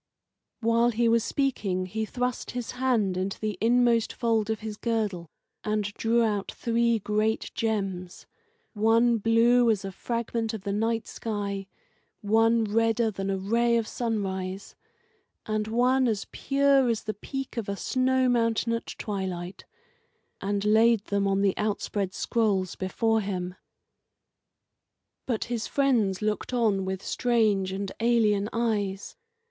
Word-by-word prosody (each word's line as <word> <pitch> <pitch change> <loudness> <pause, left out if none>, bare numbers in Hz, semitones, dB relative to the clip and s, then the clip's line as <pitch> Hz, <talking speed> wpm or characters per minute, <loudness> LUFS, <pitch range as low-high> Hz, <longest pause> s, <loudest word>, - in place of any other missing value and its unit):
While 230 +1 +3
he 235 0 +1
was 230 -1 +3
speaking 205 -11 -1
he 220 +4 -3
thrust 250 +2 -3
his 245 - -4
hand 245 -7 +1
into 190 +2 -3
the 215 -2 -2
inmost 235 0 +3
fold 225 -2 0
of 220 -1 -2
his, 215 -1 -5
girdle 210 -7 -2 0.3
and 215 0 0
drew 230 +2 +2
out 205 -3 -1
three 235 -1 +1
great 215 +1 -1
gems 195 -5 -3 0.5
one 230 +2 +3
blue 230 +2 +4
as 205 -3 +1
a 195 - -4
fragment 230 +2 -3
of 205 - -8
the 200 - -2
night 225 +1 0
sky, 200 -3 -4 0.5
one 225 +2 +3
redder 225 +1 +1
than 195 -1 -4
a 195 - 0
ray 235 +5 +2
of 225 -2 -1
sunrise, 195 -4 -3 0.7
and 215 0 -1
one 250 +3 +2
as 215 -4 -1
pure 275 -2 +3
as 230 -2 -1
the 215 - -3
peak 270 +6 -6
of 230 -4 -3
a 200 - -3
snow 260 +2 +1
mountain 230 -1 +1
at 230 - -3
twilight 190 -3 -5 0.8
and 200 +1 -1
laid 220 0 +4
them 200 0 0
on 195 0 +1
the 195 -2 +2
outspread 205 -2 -2
scrolls 200 -6 0
before 225 +4 0
him. 180 -3 -3 1.7
But 235 -4 0
his 235 -2 -3
friends 225 -9 +1
looked 215 +4 -2
on 215 -6 +1
with 190 0 -4
strange 215 -6 +1
and 195 0 -4
alien 220 -3 +2
eyes. 205 -4 -2
220 Hz, 140 wpm, -27 LUFS, 200-235 Hz, 1.7 s, blue